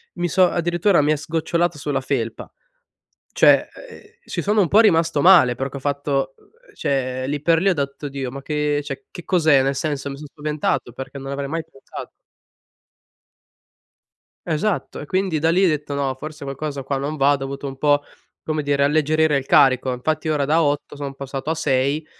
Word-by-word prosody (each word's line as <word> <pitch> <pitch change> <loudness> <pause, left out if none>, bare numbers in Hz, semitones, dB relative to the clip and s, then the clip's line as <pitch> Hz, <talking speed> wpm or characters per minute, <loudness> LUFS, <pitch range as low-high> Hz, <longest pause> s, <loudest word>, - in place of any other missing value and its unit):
Mi 175 -1 -1
so 185 +1 +4
addirittura, 175 0 +2
mi 150 +1 +2
è - - +3
sgocciolato 165 +2 -1
sulla 140 -2 -2
felpa, 120 -4 -3 0.8
cioè, - - +5 0.2
ehm, - - -12 0.2
ci - - -4
sono 210 0 +2
un 170 - 0
po' 215 - +6
rimasto 165 -7 +3
male, 170 -10 +7
perché 135 +1 -4
ho - - -6
fatto 140 -1 -1
ehm, 485 +3 -25
cioè, 130 -2 -2
lì 145 0 -3
per 165 0 +3
lì, 195 - +2
ho 185 - +3
detto: 140 0 -4
"Oh - - -3
Dio, 135 -2 -5
ma 140 +1 -7
che, 150 0 -1
cioè, 140 -1 -7
che 175 - -10
cos'è?" 155 -7 +4
Nel 135 +1 0
senso, 145 -3 -2
mi 140 - -6
sono 150 0 -10
spaventato, 150 -5 -2
perché 135 +2 -8
non 135 0 -7
avrei 140 0 -3
mai 165 +2 -2
pensato 135 -4 -10 2.4
Esatto, 175 +5 -2
e 145 - -8
quindi 185 -2 0
da 160 +2 +2
lì, 185 +3 +4
detto: 150 -3 -1
"No, 140 -2 -1
forse 150 +2 -8
qualcosa 140 +1 -5
qua 135 +1 -2
non 145 +3 -3
va." 140 0 +4
Ho 145 - +2
dovuto 135 +1 -6
un 135 - -6
po', 145 +1 +2 0.4
come 155 -1 -2
dire, 140 0 +1
alleggerire 155 0 +2
il 135 - -1
carico. 130 -3 +4
Infatti, 155 +5 -2
ora 150 -2 +1
da 160 +4 +3
8 145 0 -1
sono 140 -1 -5
passato 135 +1 -5
a 160 - +1
6, 140 +1 0
145 Hz, 195 wpm, -21 LUFS, 140-160 Hz, 2.4 s, male